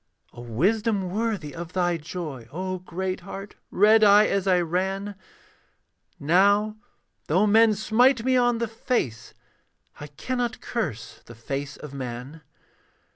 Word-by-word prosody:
A 120 - -10
wisdom 190 - 0
worthy 205 -8 -2
of 170 +1 -8
thy 175 -2 +1
joy, 150 -6 -7
O 185 +3 -4
great 185 +1 -4
heart, 195 +2 -9 0.2
read 215 +3 +5
I 205 +1 +7
as 200 -2 -1
I 180 -1 +4
ran; 190 +4 -2 1.1
Now, 200 +7 +3 0.5
though 185 +7 +3
men 220 +1 +5
smite 230 +4 +3
me 260 0 +3
on 245 -1 +3
the 235 0 -2
face, 220 - -3 0.6
I 150 - -7
cannot 240 - -3
curse 145 - -5
the 115 - -11
face 140 +5 -5
of 150 -2 -10
man. 130 +3 -7
185 Hz, 130 wpm, -25 LUFS, 150-215 Hz, 1.1 s, I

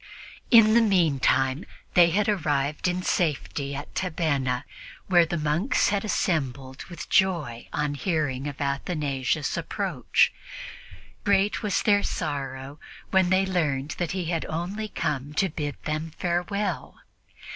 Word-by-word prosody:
In 225 -3 +7
the 235 - +6
meantime 150 - +2 0.3
they 175 -1 +6
had 200 +4 +1
arrived 150 -7 0
in 180 +1 -1
safety 145 -5 -1
at 145 +2 -7
Tabenna, 145 -8 -1 0.4
where 175 -3 +4
the 170 - -2
monks 155 - +1
had 200 -1 0
assembled 135 - -2
with 175 - -8
joy 165 -12 +1
on 150 0 -1
hearing 145 -4 -1
of 140 -2 -6
Athanasius' 140 -1 -1
approach. - - +1 0.9
Great 200 0 +2
was 210 -3 0
their 205 -1 +4
sorrow 140 -4 -4 0.3
when 190 -2 +4
they 190 +1 +3
learned 150 -7 -1
that 175 -1 -1
he 185 -2 -2
had 165 -1 -1
only 185 +7 -3
come 145 -6 -3
to 190 +5 +2
bid 145 -2 -4
them 155 +1 -2
farewell. 180 +1 -2
160 Hz, 130 wpm, -26 LUFS, 140-185 Hz, 0.9 s, In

